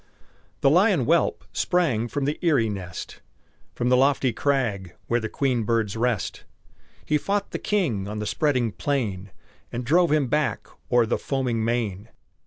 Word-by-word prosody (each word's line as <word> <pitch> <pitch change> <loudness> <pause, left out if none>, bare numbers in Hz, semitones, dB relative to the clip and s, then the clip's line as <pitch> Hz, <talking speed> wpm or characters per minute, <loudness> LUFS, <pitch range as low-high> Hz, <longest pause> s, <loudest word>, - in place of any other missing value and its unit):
The - - +5
lion - - +4
whelp - - +1
sprang 155 - +1
from 140 +3 -2
the 145 +2 -2
eyrie 145 -11 +2
nest, 90 -4 -7 0.5
From 120 - 0
the 125 - +5
lofty 130 -1 +3
crag 110 -11 -1
where 120 - +1
the 110 -1 -4
queen 130 -4 0
birds 110 -2 0
rest; 115 -3 -1 0.6
He 150 - +1
fought 200 +5 -1
the - - -3
King 135 - 0
on 105 +1 -5
the 105 - -3
spreading 125 -2 +1
plain, 105 -7 -2 0.4
And 120 +1 -4
drove 170 +4 +3
him 150 -2 +3
back 150 +4 0 0.3
o'er 120 -1 +5
the - - -1
foaming 125 -5 -1
main. 110 -3 -2
120 Hz, 160 wpm, -24 LUFS, 110-145 Hz, 0.6 s, The